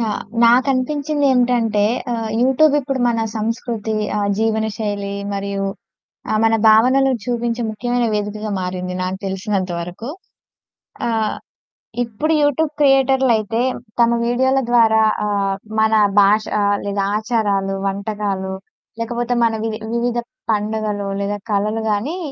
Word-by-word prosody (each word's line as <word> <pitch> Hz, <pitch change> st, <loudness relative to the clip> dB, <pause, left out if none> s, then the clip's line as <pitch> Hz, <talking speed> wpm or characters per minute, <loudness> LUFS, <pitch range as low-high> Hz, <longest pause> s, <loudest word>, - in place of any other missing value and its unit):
Yeah! 220 Hz, -3 st, -2 dB, 0.2 s
నాకనిపించిందేంటంటే 255 Hz, -3 st, +2 dB, 0.3 s
ఆహ్, 225 Hz, -2 st, -3 dB
YouTube 270 Hz, +4 st, +4 dB
ఇప్పుడు 270 Hz, -1 st, -3 dB
మన 230 Hz, -1 st, 0 dB, 0.2 s
సంస్కృతి, 220 Hz, 0 st, -3 dB, 0.2 s
ఆహ్, 200 Hz, 0 st, 0 dB
జీవన 220 Hz, 0 st, +1 dB
శైలి 205 Hz, -2 st, -3 dB, 0.2 s
మరియు 200 Hz, 0 st, -3 dB, 0.7 s
ఆహ్, 215 Hz, -, +2 dB
మన 225 Hz, 0 st, +4 dB
భావనలు 260 Hz, +5 st, +5 dB
చూపించే 240 Hz, -1 st, -2 dB
ముఖ్యమైన 240 Hz, +2 st, -1 dB
వేదికగా 210 Hz, +1 st, -3 dB
మారింది 180 Hz, 0 st, -4 dB
నాకు 185 Hz, +1 st, -3 dB
తెలిసినంత 190 Hz, -1 st, -2 dB
వరకు. 180 Hz, +8 st, -7 dB, 1.0 s
ఆహ్, 220 Hz, -2 st, 0 dB, 0.7 s
ఇప్పుడు 245 Hz, +8 st, -1 dB
యూట్యూబ్ 290 Hz, +1 st, +1 dB
క్రియేటర్లయితే 260 Hz, -5 st, +3 dB, 0.4 s
తమ 235 Hz, -, +5 dB, 0.2 s
వీడియోల 260 Hz, +3 st, +2 dB
ద్వారా 225 Hz, -2 st, +5 dB, 0.3 s
ఆహ్, 200 Hz, -1 st, 0 dB, 0.2 s
మన 220 Hz, 0 st, +3 dB, 0.3 s
భాష 210 Hz, +2 st, +3 dB, 0.4 s
లేదా 200 Hz, 0 st, -1 dB
ఆచారాలు, 205 Hz, -3 st, 0 dB
వంటకాలు, 195 Hz, -1 st, -3 dB, 0.5 s
లేకపోతే 240 Hz, +1 st, -2 dB
మన 230 Hz, -1 st, +2 dB
వి -, -, -1 dB, 0.2 s
వివిధ 240 Hz, 0 st, 0 dB, 0.3 s
పండగలు 210 Hz, -1 st, -2 dB
లేదా 205 Hz, +1 st, -2 dB
కళలు 210 Hz, +2 st, 0 dB
గాని, 240 Hz, -, -2 dB
220 Hz, 115 wpm, -19 LUFS, 205-245 Hz, 1.0 s, భావనలు